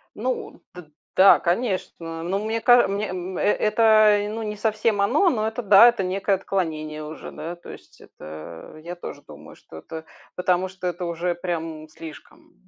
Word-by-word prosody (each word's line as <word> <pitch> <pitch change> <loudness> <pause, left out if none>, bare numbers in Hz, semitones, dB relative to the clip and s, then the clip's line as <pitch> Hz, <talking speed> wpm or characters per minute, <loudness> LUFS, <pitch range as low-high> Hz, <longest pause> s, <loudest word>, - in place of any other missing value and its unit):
Ну 250 +3 -4
д 175 -4 -12 0.3
да, 195 +1 +7
конечно. 175 -4 -2
Ну 195 +4 -2
мне 225 +1 -2
каж 245 0 +6
мне, 205 +2 -2
м, 185 0 -5
э - - -2
это 215 0 +4
ну 225 +1 -5
не 210 0 -4
совсем 215 -1 0
оно, 295 - +3
но 220 -6 -1
это 225 +2 -4
да, 205 +3 +8
это 235 -5 -2
некое 195 +2 0
отклонение 155 -5 -3
уже, 155 +1 -9
да, 170 +2 -7
то 175 - -15
есть. - - -15
Это 80 - -11
я 175 +1 -6
тоже 175 - -9
думаю, - - -13
что 80 - -14
это 160 - -9 0.3
потому 180 +1 +1
что 185 -1 -6
это 175 0 -3
уже 170 +1 -2
прям 165 -3 -5
слишком. 160 0 -13
185 Hz, 175 wpm, -23 LUFS, 165-215 Hz, 0.3 s, да